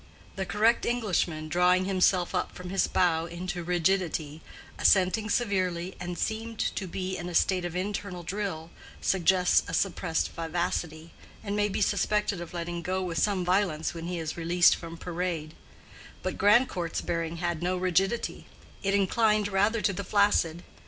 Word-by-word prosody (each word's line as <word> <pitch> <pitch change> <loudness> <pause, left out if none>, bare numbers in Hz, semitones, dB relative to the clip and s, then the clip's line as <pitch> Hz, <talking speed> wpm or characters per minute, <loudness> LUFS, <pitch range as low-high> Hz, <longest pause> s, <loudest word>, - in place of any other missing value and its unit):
The 190 -1 -3
correct 215 +5 +3
Englishman, 185 -9 -1
drawing 180 +3 +3
himself 185 -2 +2
up - - -2
from 180 0 -7
his 195 - +2
bow 170 -2 +1
into 175 +1 -5
rigidity, 170 -3 0 0.4
assenting 200 +3 +3
severely, 185 -5 0
and 175 0 -5
seemed 225 +1 -3
to 195 - -2
be 185 +1 -4
in 175 0 -5
a 175 - -6
state 185 0 +2
of 175 0 -5
internal 190 -1 -3
drill, 175 -3 -4 0.3
suggests 180 -1 +3
a - - -2
suppressed 175 -3 0
vivacity, 165 -1 -3 0.3
and 200 -1 -3
may 210 0 +1
be 200 - -2
suspected 205 -2 0
of 170 - -8
letting 170 0 -4
go 185 +2 -2
with 170 -2 -2
some 195 -4 +1
violence 180 -4 +1
when 165 0 -6
he 180 0 -3
is 160 -1 -4
released 170 +1 +4
from 165 -1 -8
parade; 170 -3 -3 0.7
but - - -2
Grandcourt's 205 -5 +2
bearing 165 0 -2
had 175 -1 -2
no 180 +1 0
rigidity, 185 +5 0 0.3
it 195 0 +1
inclined 210 +1 +2
rather 205 +3 +2
to 200 - +2
the 200 - -4
flaccid. 185 -4 +2
180 Hz, 160 wpm, -28 LUFS, 170-200 Hz, 0.7 s, released